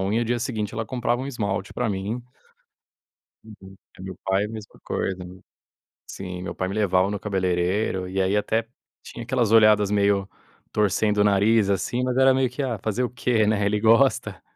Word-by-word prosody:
unha, 105 +5 0
o - - -1
dia 120 +1 0
seguinte 110 -3 -3
ela 110 0 -3
comprava 120 +1 -1
um - - -4
esmalte 100 -7 -3
pra 125 - -1
mim. 100 +5 -3 1.2
Uhum, 100 -3 -14 0.2
eh, - - -9
meus 95 -1 -7
pai 95 +1 +1
a - - -5
mesma 110 -1 -10
coisa. 95 - -2 0.9
Sim, 90 -2 -7
meu 90 - -5
pai 95 - -2
me 95 - -4
levava 95 -3 +2
no 105 -1 -4
cabeleireiro, 95 0 -1
e 95 +1 -2
aí, 95 +2 +1
até 110 +2 0 0.4
tinha 120 - -9
aquelas 120 -2 0
olhadas 105 -2 +5
meio 100 -1 +2 0.4
torcendo 105 0 +1
o 105 - +4
nariz, 105 +1 +3
assim, 110 +5 -1
mas 125 0 -1
era 135 0 +5
meio 130 -1 +1
que: 130 +3 -4
"Ah 120 -4 -2
fazer 110 +3 -1
o 125 - -3
quê, 120 -3 +1
né, 105 -1 +1
ele 105 +1 +1
gosta". 115 -2 +2
105 Hz, 190 wpm, -24 LUFS, 95-115 Hz, 1.2 s, olhadas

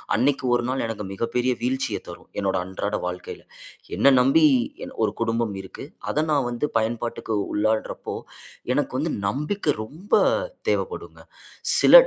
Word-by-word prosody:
அன்னக்கி 130 +4 +2
1, 120 0 0 0.2
எனக்கு 105 -2 -4
மிகப்பெரிய 125 +4 0
வீழ்ச்சிய 130 +2 0
தரும். - - -11
என்னோட 100 -1 +1
அன்றாட 95 +2 -2
வாழ்க்கையில. 90 0 -6 0.5
என்ன 140 - +6
நம்பி 135 +5 +5 0.4
எ - - -8 0.2
ஒரு - - -2
குடும்பம் 115 -2 0
இருக்கு. 95 - -9 0.3
அத 155 +1 +1
நான் 140 -4 +2
வந்து 120 +4 -1
பயன்பாட்டுக்கு 115 0 -2 0.2
உள்ளாட்றப்போ, 110 +1 -1 0.6
எனக்கு 145 0 0
வந்து 160 +3 -1 0.2
நம்பிக்க 150 - 0
ரொம்ப 160 - -13 0.6
தேவைப்படுங்க. 455 - -2 0.6
சில - - +6
120 Hz, 130 wpm, -24 LUFS, 110-145 Hz, 0.6 s, என்ன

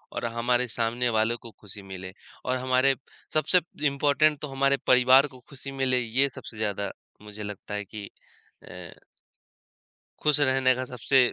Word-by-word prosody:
और - - -2
हमारे 120 +2 0
सामने 120 +2 -1
वालों 110 +1 +1
को 115 -1 -12
खुशी 105 -1 -11
मिले। 95 -1 -8 0.3
और 130 0 0
हमारे 130 +1 +3 0.4
सबसे 155 +4 +4 0.3
इम्पोर्टेंट 145 +2 +2
तो 150 - -4
हमारे 140 0 +1
परिवार 130 +3 +6
को 130 -2 -15
खुशी 135 0 -8
मिले, 130 -2 +1
ये 125 +4 +1
सबसे 115 -3 -10
ज़्यादा 100 -2 -2 0.3
मुझे 105 0 -9
लगता 105 0 -7
है 105 0 -3
कि 105 0 -8 0.5
अ - - -10 1.3
खुश 150 -1 +4
रहने 130 -2 +4
का 130 0 -3
सबसे 125 +2 +1
125 Hz, 155 wpm, -27 LUFS, 110-135 Hz, 1.3 s, परिवार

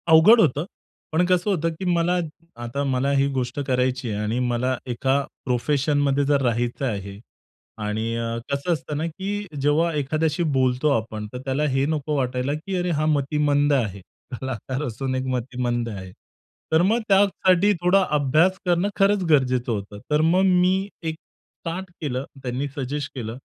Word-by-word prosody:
अवघड 165 +9 +8
होतं 150 -2 +2 0.5
पण 165 +3 +2
कसं 180 +2 +1
होतं 165 -3 +1
की 190 - -4
मला 175 +1 +2 0.5
आता 120 +4 -3
मला 135 0 0
ही 135 0 +3
गोष्ट 130 +1 -2
करायची 125 -1 0
आहे 105 -1 -2
आणि 110 +3 -1
मला 125 +1 0
एका 130 +3 +1 0.3
प्रोफेशनमध्ये 140 +2 +1
जर 140 0 +2
राहायचं 120 +1 0
आहे 100 -4 -4 0.6
आणि 110 +2 -2
अ, 115 0 -2
कसं 140 +5 0
असतं 150 -2 -4
ना, 155 - -1
की 200 +5 -4 0.2
जेव्हा 155 +4 +2
एखाद्याशी 155 +3 0
बोलतो 130 -1 +1
आपण, 110 -1 -5
तर - - -4
त्याला 135 +2 0
हे 135 0 +1
नको 150 -1 -1
वाटायला 130 0 -1
की 165 +6 -4
अरे 180 0 -1
हा 155 -1 0
मतिमंद 145 0 +2
आहे. 105 -8 0 0.3
कलाकार 130 +1 -4
असून 130 +2 -3
एक 130 0 -2
मतिमंद 125 -1 -2
आहे. 95 -3 -7 0.6
तर 160 +1 +5
मग 215 +6 +3
त्यासाठी 195 0 +4
थोडा 185 +2 +4
अभ्यास 155 +7 +3
करणं 175 +2 +2
खरंच 200 0 +3
गरजेचं 130 -5 +2
होतं. 100 -1 -4
तर 150 +1 +4
मग 170 +4 +3
मी 185 +1 +3
एक 160 -1 -2
स्टार्ट 175 +3 -9
केलं. 135 -3 -2 0.2
त्यांनी 130 +3 -2
सजेस्ट 140 +1 -3
केलं. 115 -2 -5
140 Hz, 160 wpm, -23 LUFS, 125-165 Hz, 0.6 s, अवघड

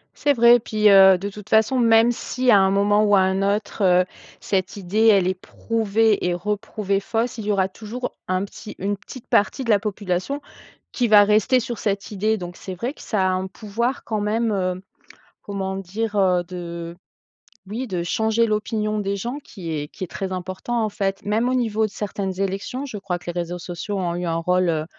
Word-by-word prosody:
C'est 290 - +2
vrai, 240 -1 +6
puis, 215 -1 +2
heu, 190 -1 +8
de 195 +3 -5
toute 210 +1 -12
façon, 220 +4 +3
même 230 0 +5
si, 250 +1 0
à 205 - +7
un 190 0 +4
moment 205 +2 +3
ou 205 -1 +4
à 195 - +5
un 190 +1 +1
autre, 205 +2 -1
heu, 180 -1 +4 0.4
cette 190 0 -1
idée, 205 +4 +1
elle 195 -4 +5
est 185 - +1
prouvée 220 +2 0
et 175 - 0
re-prouvée 200 +1 -2
fausse. 225 +4 -2
Il 215 - -5
y - - +2
aura 190 -2 +2
toujours 225 +6 -6 0.2
un 185 +1 0
petit 210 - -10
une 200 +2 -1
petite 235 +5 -12
partie 210 +6 +2
de 230 - 0
la 205 - +5
population 205 +5 -2 0.5
qui 245 -2 0
va 210 -1 +8
rester 215 +5 +3
sur 235 -1 -5
cette 200 -1 -2
idée 215 +2 +1
donc 175 -1 -7
c'est 190 - -7
vrai 240 +10 -4
que - - -14
ça 195 -4 0
a - - +1
un 185 +1 -1
pouvoir 230 +6 -3
quand 215 -2 -2
même, 225 +2 0
hem, 185 -2 -1 0.6
comment 190 -1 -4
dire? 205 +3 -4
Heu, 185 -3 +3
de 170 -1 -7 0.7
oui, 225 +7 -4
de 180 -6 -3
changer 220 +6 +1
l'opinion 215 0 -1
des 200 -1 -1
gens 240 +8 -4
qui 180 -10 -8
est 150 -2 -3
qui - - -12
est - - -9
très 190 +2 -5
important, 185 +6 -3
en - - 0
fait. 195 -1 -3
Même 220 +4 +1
au 255 - +1
niveau 220 -3 +1
de - - -10
certaines 195 -2 -4
élections, 195 +7 -3
je 255 -7 -6
crois 190 -3 -3
que - - -17
les 175 - -3
réseaux 175 +1 -4
sociaux 180 +4 -5
ont 175 -2 -1
eu 175 - -3
un 165 -1 0
rôle, 180 +2 +1
heu, 155 -1 -1
200 Hz, 215 wpm, -22 LUFS, 185-220 Hz, 0.7 s, heu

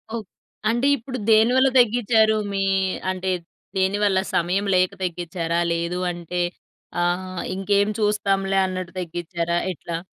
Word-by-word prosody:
ఓక్ 215 -5 -5 0.4
అంటే 240 +4 +2
ఇప్పుడు 255 +2 -6
దేనివల్ల 245 +5 +5
దగ్గిచ్చారు 220 -2 +4 0.2
మీ 195 - 0 0.5
అంటే, 185 0 -2 0.5
దేనివల్ల 190 0 +2 0.2
సమయం 180 +4 +1
లేక 185 0 +3
తగ్గిచ్చారా? 170 -1 -2
లేదు 170 +2 -2
అంటే 175 +1 -4 0.6
ఆహ్, 185 +1 -1
ఇంకేం 200 +1 +2
చూస్తాంలే 195 -2 +1
అన్నట్టు 185 -1 -5
దగ్గిచ్చారా? 170 0 -2
ఎట్లా? 165 +3 -5
190 Hz, 115 wpm, -23 LUFS, 175-210 Hz, 0.6 s, దేనివల్ల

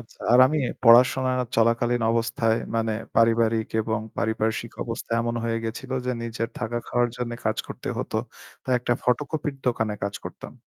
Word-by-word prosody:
আচ্ছা 115 - -17
আর 125 - +7
আমি 155 +4 0 0.2
পড়াশোনা 125 +2 +6 0.3
চলাকালীন 115 +1 +2
অবস্থায় 115 -1 +1 0.2
মানে 115 -1 0 0.2
পারিবারিক 115 -1 +3
এবং 110 0 -1 0.2
পারিপার্শ্বিক 110 +1 -1
অবস্থা 115 0 -5
এমন 120 0 -1
হয়ে 115 0 0
গেছিল 115 +4 -5 0.2
যে - - +1
নিজের 115 0 -3
থাকা 120 +2 -2
খাওয়ার 120 0 +2
জন্য 120 -1 -3
কাজ 110 - +1
করতে - - -7
হতো। - - -3 0.5
তাই 130 - +1
একটা 120 - 0
ফটোকপির 145 +4 -1
দোকানে 110 -3 0
কাজ 100 +1 -2
করতাম। - - -8
115 Hz, 155 wpm, -25 LUFS, 115-120 Hz, 0.5 s, আর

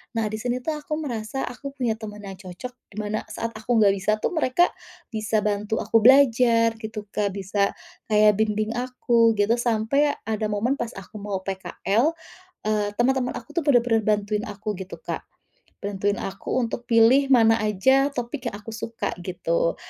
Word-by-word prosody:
Nah, 225 -1 +1
di 215 - -4
sini 245 +2 -2
tuh 320 - -1
aku 305 +1 -4
merasa 265 -4 -4
aku 275 +3 -7
punya 230 -5 -1
teman 210 -2 -8
yang 195 -1 -8
cocok, 195 +7 -8 0.2
di - - -16
mana 210 +1 -3
saat 230 - -4
aku 240 +2 0
enggak 205 -3 +6
bisa 195 +3 0
tuh - - +1
mereka 325 +1 +2 0.4
bisa 215 -1 0
bantu 210 +1 -1
aku 225 - +3
belajar 235 -2 +5
gitu, 215 -1 -6
Kak, 200 -2 -1
bisa 200 +1 0 0.3
kayak 210 -1 +4
bimbing 215 0 +1
aku, 240 -2 +2
gitu. 205 +3 +3
Sampai 240 +5 +2
ada 220 -1 -2
momen 225 +6 +1
pas 235 -1 -3
aku 195 +2 -9
mau 195 -2 -3
PKL, 200 - 0 0.5
eee, 210 -1 +1
teman-teman 250 +1 +1
aku 230 - -8
tuh 340 - +1
benar-benar 235 -4 +4
bantuin 210 +1 -3
aku 210 +1 -4
gitu, 190 0 -7
Kak. - - -5 0.6
Bantuin 200 0 0
aku 195 +5 -4
untuk 240 +1 -4
pilih 235 +4 +5
mana 225 -2 +5
aja 265 +7 +3
topik 245 +3 -4
yang - - -7
aku 220 +2 -9
suka, 225 +1 -4
gitu. 170 -2 0
220 Hz, 170 wpm, -24 LUFS, 205-245 Hz, 0.6 s, enggak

